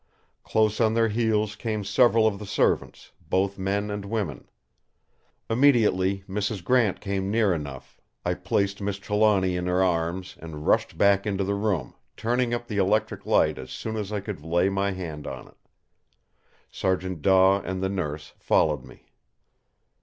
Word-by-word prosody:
Close 110 0 +1
on 110 0 +3
their 115 -1 +3
heels 110 -1 0
came 110 -1 -3
several 115 +1 +4
of 100 -2 +1
the 105 - -7
servants, - - 0 0.2
both 95 +1 0
men 100 +2 -1
and 105 -1 -4
women. 100 -7 -4 1.0
Immediately 110 -7 +3
Mrs. 100 0 -3
Grant 115 -1 +2
came 100 -1 -2
near 105 -3 +2
enough, 70 -5 -7 0.2
I 90 - +1
placed 100 +2 -1
Miss 100 0 -2
Trelawny 100 -2 +2
in 90 0 -2
her 90 +1 +2
arms, 90 +1 -1
and 80 -2 -8
rushed - - +1
back 100 0 +3
into 100 -1 0
the 100 +1 -1
room, 100 - -1 0.2
turning 120 +2 0
up 120 0 -2
the 105 - -4
electric 100 +3 0
light - - +3
as 65 - -8
soon 110 +10 -5
as 105 -2 -4
I 105 -2 -2
could 100 -6 -6
lay 85 +4 +2
my 100 0 0
hand 80 -6 -6
on 65 -2 -7
it. - - -21 1.1
Sergeant 95 -3 -2
Daw 95 +2 +5
and 95 0 -4
the - - +2
Nurse 75 -6 -4
followed 75 -4 +2
me. - - -16
100 Hz, 160 wpm, -25 LUFS, 90-105 Hz, 1.1 s, Daw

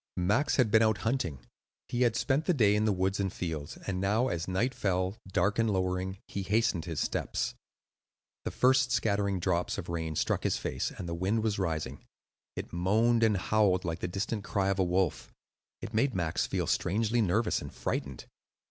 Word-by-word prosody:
Max 105 +11 +2
had 125 -6 +3
been 110 +1 +6
out 110 -2 +3
hunting. 90 - -1 0.5
He 120 - -2
had 120 -3 +3
spent 145 +5 +1
the 180 - +2
day 105 -6 +4
in 105 +1 +2
the 110 - +3
woods 95 +1 0
and 95 -2 0
fields, 80 -5 -5
and 95 -2 -2
now 110 +6 +2
as 85 +1 -3
night 95 +8 0
fell, 95 -2 0
dark 100 +3 +1
and 115 -1 +3
lowering, 95 -1 -1
he 100 - -4
hastened 100 -3 +1
his 80 -4 -4
steps. - - -1 0.9
The - - -2
first 130 0 +3
scattering 100 -4 +1
drops 90 0 0
of 95 -4 -6
rain 80 -2 -3
struck - - 0
his - - 0
face, - - -2
and 85 - -7
the 85 - -3
wind 95 +6 0
was 105 -3 0
rising. 80 -5 -2 0.5
It - - -6
moaned 110 +7 +2
and 110 -3 +4
howled 95 -2 +2
like 85 0 -2
the - - -2
distant 100 +3 -3
cry 100 -1 0
of 95 0 0
a - - +4
wolf; 90 -2 0 0.5
it 110 - -7
made 115 +3 +1
Max 85 -3 0
feel - - -1
strangely 110 +5 +1
nervous 105 +3 +1
and - - -7
frightened. 70 -2 -4
100 Hz, 190 wpm, -30 LUFS, 90-110 Hz, 0.9 s, been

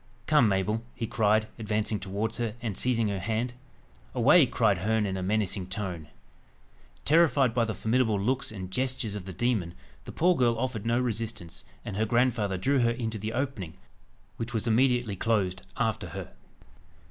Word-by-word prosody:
"Come, 150 -5 +5
Mabel!" 100 +3 0
he 115 - -3
cried, 110 0 +2
advancing 105 -1 -1
towards 100 +5 -3
her, 115 -2 -2
and 115 -5 -3
seizing 115 -1 +1
her 100 -1 -2
hand. 115 +6 -1 0.6
"Away!" 140 +5 +6
cried 110 -7 +2
Herne 110 +3 +1
in 95 -1 -2
a 95 - -3
menacing 100 -1 0
tone. 95 -5 -4 1.0
Terrified 145 -5 +4
by 120 -1 +2
the 110 - -3
formidable 110 -2 +1
looks 130 +6 0
and 95 -3 -7
gestures 125 -1 -1
of 100 -3 -6
the 95 - -6
demon, 95 -3 -1 0.3
the - - -7
poor 180 +2 +3
girl 120 -4 +2
offered 115 -3 -2
no 120 +1 +2
resistance, 110 - -3 0.2
and 100 - -4
her 110 - +2
grandfather 115 -5 +1
drew 135 +9 +2
her 120 -1 +3
into 115 -2 -3
the 110 +2 -4
opening, 120 - -3 0.6
which 115 +1 -4
was 110 - -1
immediately 120 -2 +2
closed 95 -3 0 0.2
after - - -1
her. - - -7
110 Hz, 170 wpm, -28 LUFS, 100-120 Hz, 1.0 s, Away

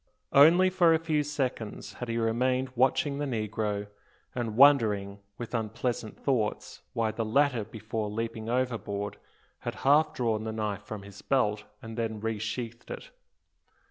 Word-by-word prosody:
Only 170 +6 +7
for 175 -3 +5
a - - +4
few 160 -2 0
seconds 135 -7 -3
had 125 - -6
he 115 - -1
remained 125 +3 +1
watching 135 +3 +2
the 145 - -1
negro, 105 -3 -2 0.5
and 115 -4 -3
wondering, 105 -8 +5 0.2
with 120 0 -7
unpleasant 115 0 -2
thoughts, 120 -7 -1
why 115 -1 +1
the 115 +2 -2
latter 125 +1 +2
before 110 0 -4
leaping 115 +1 -4
overboard 110 -5 -2 0.4
had - - -4
half 150 +3 +5
drawn 110 -3 0
the 110 - -3
knife 105 -3 -2
from 105 -1 -7
his 100 0 -12
belt 105 -6 +1 0.2
and 115 +1 -6
then 110 -2 -2
resheathed 115 +2 -4
it. - - -7
115 Hz, 145 wpm, -29 LUFS, 110-130 Hz, 0.5 s, Only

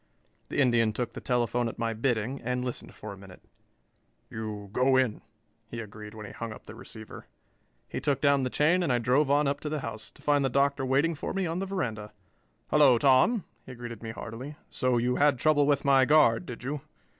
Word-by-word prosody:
The - - -2
Indian 120 -5 +3
took 120 +1 -3
the - - -7
telephone 120 -1 0
at - - -10
my 115 0 -1
bidding 120 +2 -1
and 125 +1 -2
listened 125 - -6
for 105 -1 -8
a - - -12
minute. 95 -2 -14 0.9
"You 105 -2 -6
go 130 +2 +3
in," 130 -5 +1 0.5
he 115 - -6
agreed 105 -1 -9
when 110 -1 -8
he - - -9
hung 115 -1 -6
up - - -11
the - - -10
receiver. 110 -1 -11 0.6
He - - -5
took 140 -3 0
down 140 -1 +3
the 130 - -1
chain 160 +8 +2
and 170 -6 0
I 125 - +3
drove 130 +5 +2
on 145 +1 +3
up 140 +1 -1
to 150 - -4
the 150 -1 -3
house, 110 -2 -6
to - - -20
find 145 -1 +3
the 135 - +1
Doctor 140 +1 +1
waiting 140 +6 +2
for 155 - -5
me 195 -1 0
on 165 +1 -2
the 195 - -3
veranda. 110 - -4 0.6
"Hello, 140 -5 +6
Tom," 140 - +4 0.2
he 130 - -8
greeted 120 -2 -8
me 115 - -6
heartily. 115 +6 -7 0.2
"So 125 -1 +1
you 125 +1 +1
had 145 -2 +4
trouble 145 +1 +3
with 145 -1 +1
my 135 -1 +5
guard, 130 -6 +4
did 125 -1 -8
you?" 140 +2 -3
125 Hz, 215 wpm, -28 LUFS, 115-145 Hz, 0.9 s, Hello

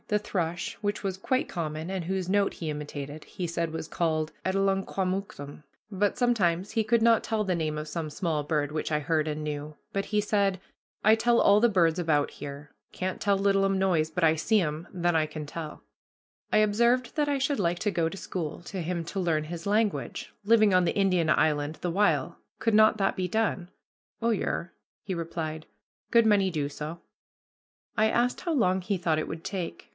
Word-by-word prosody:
The 210 - +2
thrush, 175 -4 -2
which 205 0 -2
was 195 -2 -1
quite 255 +7 0
common, 160 -1 -4
and 190 -2 -2
whose 185 +1 -2
note 200 +1 +2
he 160 - -4
imitated, 150 0 -6
he 180 - -5
said 170 -1 -2
was 160 0 -5
called 155 -2 -1
Adelungquamooktum; 190 -5 -1 0.3
but 205 0 0
sometimes 195 -7 +1
he 225 - +1
could 225 +2 +2
not 230 -1 +5
tell 215 -1 -1
the 185 -2 0
name 155 -2 -2
of 150 0 -4
some 160 0 -4
small 155 -2 -1
bird 150 -1 -1
which 155 0 -2
I 150 - +2
heard 155 +1 0
and 155 0 -3
knew, 150 0 -5 0.2
but 195 0 -1
he 210 - 0
said, 200 -2 +1 0.4
"I 215 +1 +6
tell 235 +1 +3
all 205 +1 +5
the 240 - +5
birds 170 -5 +3
about 155 -4 +1
here; 145 +1 -8 0.2
can't 185 0 -4
tell 200 -1 +2
littlum 195 -1 +2
noise, 175 -5 +2
but 180 - -2
I 160 0 +5
see 215 +7 +2
'em, 155 -1 -2
then 175 -2 0
I 155 -1 +2
can 155 0 -6
tell." 155 +1 -7 0.7
I - - +4
observed 235 +4 +2
that 295 -1 +1
I 285 - +1
should 275 -1 0
like 175 -2 0
to 210 - 0
go 165 -3 +1
to 195 - -8
school 170 -5 -4
to 185 +1 -5
him 170 0 -3
to 195 - -4
learn 160 -4 +1
his 170 +1 -7
language, 210 +1 -1
living 215 -1 +5
on 185 0 +5
the 170 - 0
Indian 185 -5 +2
island 150 0 +2
the 175 - -3
while; 205 +4 +1 0.2
could 225 - +1
not 215 0 +6
that 195 -2 +1
be 185 -1 -2
done? 200 -4 0 0.5
"Oh, 230 +1 +2
yer," 185 -4 -2 0.3
he 195 - -3
replied, 160 -2 -4 0.4
"good 230 -1 +5
many 205 -3 +4
do 150 -5 -1
so." 150 +3 -6 1.0
I 220 +1 +3
asked 245 +2 +1
how 345 - -2
long 190 - +2
he 195 +2 -1
thought 165 -3 +1
it - - -3
would 160 0 -7
take. 190 -3 -5
180 Hz, 200 wpm, -28 LUFS, 160-205 Hz, 1.0 s, I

